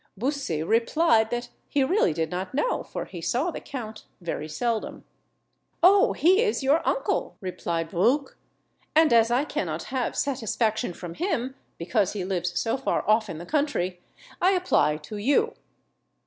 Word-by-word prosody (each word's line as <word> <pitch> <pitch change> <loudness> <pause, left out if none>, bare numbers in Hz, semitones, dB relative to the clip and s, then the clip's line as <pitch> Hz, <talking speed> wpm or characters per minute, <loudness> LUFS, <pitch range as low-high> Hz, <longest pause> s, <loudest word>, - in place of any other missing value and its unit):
Bussy 255 - -1
replied 230 - +3
that 240 +1 -3 0.2
he 280 - +2
really 285 - +2
did 160 0 -2
not 185 +6 -4
know, - - +1
for - - -6
he 175 - -9
saw 265 - 0
the - - -6
count 220 -5 -7
very 165 -3 -4
seldom. 230 +5 -2 0.8
"Oh, 390 +3 +6
he 375 +6 +4
is 435 - 0
your 285 +5 +3
uncle!" - - -1
replied 170 -3 -3
Bruc; 240 - +1 0.6
"and, 315 -4 +5
as 230 0 +5
I 250 +4 +2
cannot 165 - -3
have 255 -2 -1
satisfaction 230 -5 -1
from 170 -1 -8
him, 265 - -2 0.2
because 195 +3 0
he 195 -4 -3
lives 180 -2 -1
so 225 +3 0
far 270 - -1
off 215 0 +3
in 165 - -5
the 170 - -8
country, 190 - -1 0.4
I 370 +2 +4
apply 360 - +2
to 155 +8 -8
you." 290 - +2
230 Hz, 160 wpm, -26 LUFS, 180-285 Hz, 0.8 s, Oh